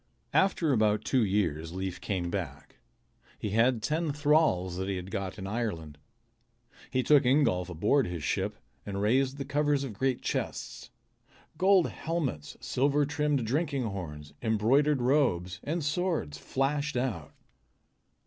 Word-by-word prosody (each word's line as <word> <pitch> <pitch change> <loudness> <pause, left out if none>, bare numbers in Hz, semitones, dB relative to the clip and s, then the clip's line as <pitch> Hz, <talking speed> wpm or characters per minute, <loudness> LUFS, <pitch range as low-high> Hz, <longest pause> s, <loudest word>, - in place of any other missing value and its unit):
After 175 -6 +3
about 105 -2 +2
two 130 -3 +2
years 85 -6 0
Leif 95 -1 -4
came 90 -3 -2
back. 75 -8 -5 0.6
He 105 - -4
had 115 +1 +2
ten 155 +1 0
thralls 145 - +2
that 95 +1 -3
he 100 - -1
had 90 +1 -6
got 95 -1 -4
in 95 - -6
Ireland. 95 -9 -4 0.9
He 130 -1 0
took 145 0 +5
Ingolf 125 - +2
aboard 105 - +2
his 85 -3 -5
ship - - -1 0.3
and 100 -1 -4
raised 130 +6 +2
the 140 - -4
covers 145 0 +1
of 130 -5 -5
great 130 +4 -1
chests. - - -4 0.7
Gold 185 +1 +4
helmets, 145 - -3
silver 140 +2 +1
trimmed 150 -3 0
drinking 140 +2 0
horns, 75 -9 -6
embroidered 125 +5 +2
robes, 105 -9 +1
and 155 +1 -2
swords 155 - -1
flashed 140 - -1
out. 100 - -3
120 Hz, 140 wpm, -29 LUFS, 95-145 Hz, 0.9 s, took